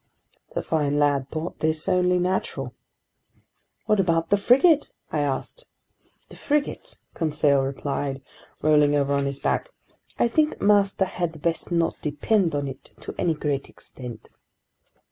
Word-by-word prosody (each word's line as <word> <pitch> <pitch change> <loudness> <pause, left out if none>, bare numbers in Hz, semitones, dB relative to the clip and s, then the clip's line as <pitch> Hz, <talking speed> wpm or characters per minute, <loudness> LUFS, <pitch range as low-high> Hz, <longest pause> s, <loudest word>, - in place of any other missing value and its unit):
The - - -1
fine 145 -2 0
lad 140 -2 +2
thought 160 +2 -5
this 155 0 +1
only 180 0 +3
natural! 175 -8 -2 1.1
"What 215 -1 +2
about 165 -2 +1
the - - +7
frigate?" 275 - +4 0.2
I 155 - 0
asked. 145 - -3 0.6
"The - - -12
frigate?" 295 -1 -2 0.2
Conseil 150 -3 +2
replied, 135 0 -3 0.4
rolling 150 -1 +4
over 140 -1 +1
on 140 0 +1
his 140 0 -4
back. - - -1 0.5
"I - - +3
think 305 +6 +1
master 200 -1 +3
had 175 -3 -4
best 170 +1 -1
not 170 -1 0
depend 165 +3 +1
on 145 -1 -1
it 135 - -9
to - - -7
any 165 -2 +1
great 145 -2 -2
extent!" 125 -3 -10
160 Hz, 140 wpm, -24 LUFS, 140-190 Hz, 1.1 s, the